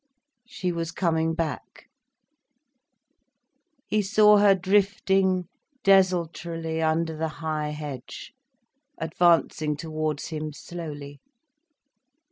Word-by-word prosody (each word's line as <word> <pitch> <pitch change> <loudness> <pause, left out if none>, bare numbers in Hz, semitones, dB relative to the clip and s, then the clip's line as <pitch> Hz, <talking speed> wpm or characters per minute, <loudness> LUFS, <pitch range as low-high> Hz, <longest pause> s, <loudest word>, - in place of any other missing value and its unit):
She 185 -7 -3
was 165 -1 -3
coming 165 -2 0
back. 160 -5 -5 2.0
He 215 - +1
saw 210 +1 +5
her 200 -1 +6
drifting 190 -1 +1 0.4
desultorily 170 -4 +1
under 160 0 0
the 160 +1 -2 0.2
high 155 -1 -1
hedge, 150 -4 -8 0.6
advancing 160 -2 +1
towards 155 -1 -3
him 155 -1 -5
slowly. 145 -4 -8
165 Hz, 85 wpm, -25 LUFS, 155-185 Hz, 2.0 s, her